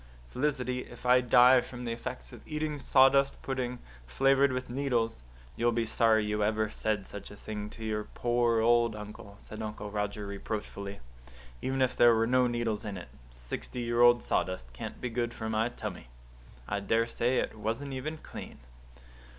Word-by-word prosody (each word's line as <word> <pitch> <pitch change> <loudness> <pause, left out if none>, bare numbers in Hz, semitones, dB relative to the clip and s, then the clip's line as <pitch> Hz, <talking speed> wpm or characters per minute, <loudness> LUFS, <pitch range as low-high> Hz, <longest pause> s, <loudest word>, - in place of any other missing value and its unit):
"Felicity, 125 -2 -1
if 125 - -10
I 125 0 +6
die 125 +1 +6
from 125 0 -8
the 115 - -2
effects 125 +2 -6
of - - -11
eating 150 -1 -2
sawdust 135 +1 +4
pudding, 125 -2 -2 0.3
flavoured 135 - +3
with 130 0 -3
needles, 120 - -1 0.3
you'll 120 0 +2
be 115 0 0
sorry 110 -1 +3
you 105 0 0
ever 110 0 +1
said 105 -3 -1
such 100 -1 -8
a 105 - -11
thing 105 0 -6
to 110 - -8
your 105 -1 -2
poor 120 -1 +1
old 120 -1 +3
uncle," 105 -1 -9
said 110 +1 -9
Uncle 105 -1 -5
Roger 105 0 -2
reproachfully. 100 0 -5 0.6
"Even 130 0 +1
if 130 - 0
there 120 -1 +6
were 115 0 +2
no 125 +1 +3
needles 120 -3 -1
in 105 -3 -5
it, 85 - -9 0.2
sixty - - -6
year 120 0 +1
old 120 0 +6
sawdust 90 -10 -1
can't - - -7
be 125 - -3
good 120 0 -2
for 110 -1 -4
my 110 +2 +1
tummy. 90 - -7 0.6
I 105 - -1
daresay 115 +4 +1
it - - -1
wasn't 115 +6 -3
even 150 +5 -4
clean." - - -9
115 Hz, 175 wpm, -30 LUFS, 105-125 Hz, 0.6 s, I